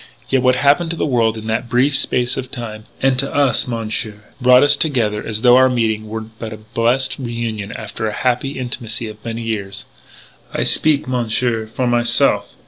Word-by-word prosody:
Yet, 135 -1 +2
what 130 0 +3
happened 145 +6 +3
to 170 - -1
the - - -1
world 115 -5 +1
in 110 - -8
that 110 +2 -2
brief 130 +4 +2
space 125 -2 +2
of 130 -1 -5
time 110 -4 -7 0.2
and 135 -1 +3
to 135 +1 -1
us, 140 -5 +2
Monsieur 110 -2 -4 0.2
brought 125 +1 +6
us 145 - +5
together 115 -9 0
as 110 -1 -2
though 125 0 +7
our 130 0 +5
meeting 110 -3 -1
were 110 +1 -4
but 110 0 -9
a - - -8
blessed 115 +5 -1
reunion 115 -4 -4
after 110 0 -5
the 110 - -1
happy 130 +4 -1
intimacy 120 -3 -3
of 110 0 -11
many 115 0 -5
years.... 100 -3 -4 0.7
I - - -1
speak, 150 -4 +2
Monsieur, 120 -2 -1
for 120 +3 -3
myself. 120 -3 +1
120 Hz, 190 wpm, -18 LUFS, 110-130 Hz, 0.7 s, though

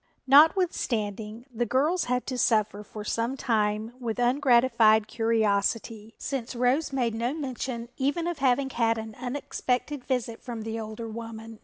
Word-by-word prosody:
Notwithstanding, 245 - +3
the 240 +1 -1
girls 300 - +1
had 250 0 -1
to 255 - -3
suffer 215 -3 +2
for 210 0 -8
some 230 +5 -1
time 215 -1 0
with 230 -3 -3
ungratified 240 -4 +4
curiosity, 225 0 0
since 260 -3 -4
Rose 255 +6 +1
made 245 -4 0
no 235 +5 -1
mention 255 -5 -4
even 290 +6 0
of 345 -3 -3
having 270 0 +2
had 230 -2 +1
an 220 0 -6
unexpected 255 +2 -3
visit 245 -4 -2
from 235 -3 -6
the 225 +1 -4
older 220 +1 -6
woman. 225 0 -8
235 Hz, 145 wpm, -27 LUFS, 220-260 Hz, -, ungratified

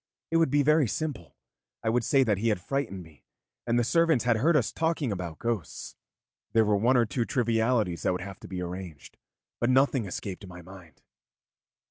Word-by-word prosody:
It 165 - +3
would 165 -3 +3
be 145 +1 +3
very 150 -1 +4
simple. 105 - -5 0.5
I 110 - +1
would 120 +1 +1
say 135 +3 +3
that 105 -6 0
he 115 - 0
had 105 -4 +1
frightened 100 -4 -3
me 80 -3 -19 0.4
and 120 0 +2
the 120 - +3
servants 165 0 +2
had 120 -2 +2
heard 155 +7 +3
us 125 - 0
talking 160 -6 -1
about 90 -5 -5
ghosts. 115 -7 -4 0.6
There 110 -1 +4
were 105 0 +2
one 120 +6 +3
or 120 - +4
two 120 +2 -1
trivialities 115 -6 0
that - - +1
would 90 - -3
have 95 +1 -8
to - - -11
be 90 -1 -4
arranged, 90 -4 -8 0.4
but 120 - +1
nothing 130 -2 +3
escaped 95 +1 -6
my 90 -1 -11
mind. 90 -4 -15
115 Hz, 195 wpm, -28 LUFS, 95-130 Hz, 0.6 s, very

